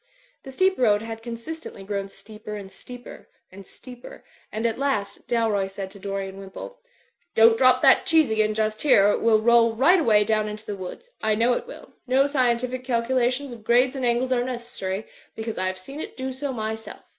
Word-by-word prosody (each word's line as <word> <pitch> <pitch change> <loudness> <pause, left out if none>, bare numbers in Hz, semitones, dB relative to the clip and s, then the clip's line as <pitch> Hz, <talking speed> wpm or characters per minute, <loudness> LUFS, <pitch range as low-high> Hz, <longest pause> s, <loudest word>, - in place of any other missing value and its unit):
The 270 - -10
steep 375 +7 +1
road 210 -4 +3
had 225 0 -7
consistently 235 +1 -8
grown 200 0 -3
steeper 210 +1 -10
and 195 -2 -8
steeper; 245 +3 -11 0.2
and 195 0 -12
steeper; 250 -1 -12 0.3
and 220 +2 -3
at 230 +1 0
last, 210 -8 -2
Dalroy 220 -5 +1
said 195 -1 -7
to 200 - -12
Dorian 195 0 -5
Wimpole, 195 - -9 0.6
"Don't 225 0 +6
drop 255 +1 +4
that 270 - +5
cheese 320 -7 +4
again 215 -1 +1
just 215 0 -1
here, 205 -9 +5
or - - +4
it - - -1
will 220 -1 +4
roll 230 -1 +4
right 315 +10 +5
away 215 -9 +4
down 215 0 0
into 210 +1 -8
the 205 - -4
woods. 195 - -9
I 215 -1 +2
know 235 +3 +3
it 245 - -3
will. - - -12
No 265 +2 +4
scientific 255 -2 0
calculations 250 +2 0
of 230 -2 -12
grades 245 +4 +3
and 265 - -4
angles 245 +2 +1
are 245 -1 +2
necessary; 235 -5 -5 0.3
because 220 -2 -5
I 185 - 0
have 185 0 -3
seen 275 +11 -9
it - - -7
do 260 0 -4
so 275 +2 -4
myself. 220 -2 -5
230 Hz, 200 wpm, -24 LUFS, 210-255 Hz, 0.6 s, Don't